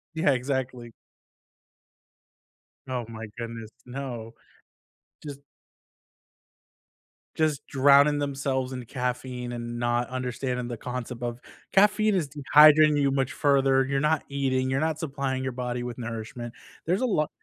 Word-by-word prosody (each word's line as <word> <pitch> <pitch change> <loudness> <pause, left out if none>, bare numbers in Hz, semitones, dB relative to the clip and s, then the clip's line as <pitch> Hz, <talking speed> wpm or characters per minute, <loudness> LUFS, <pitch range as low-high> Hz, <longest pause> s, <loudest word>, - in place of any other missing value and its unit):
Yeah, 160 -3 +3
exactly. 125 -2 -3 2.0
Oh 125 -2 -3
my 115 0 -7
goodness. 115 -2 -6 0.2
No. 125 -3 -6 0.9
Just 140 -2 -7 2.0
just 155 -3 0
drowning 140 +2 +5
themselves 135 -2 -2
in 125 - -5
caffeine 125 0 -4
and 120 0 -5
not 120 0 0
understanding 125 -1 -3
the 120 - -4
concept 125 0 -6
of 120 0 -3 0.3
"Caffeine 210 +2 +4
is 175 -6 0
dehydrating 150 +1 +6
you 140 -1 +3
much 135 +1 0
further. 135 -3 +3
You're 135 0 -1
not 155 0 +1
eating, 130 -2 0
you're 135 +2 0
not 160 -1 -1
supplying 140 -4 -2
your 130 -1 -3
body 125 0 -3
with 120 -1 -5
nourishment." 115 0 -6 0.3
There's 180 +6 +1
a 255 - +1
lot 155 -11 +1
130 Hz, 125 wpm, -26 LUFS, 120-145 Hz, 2.0 s, dehydrating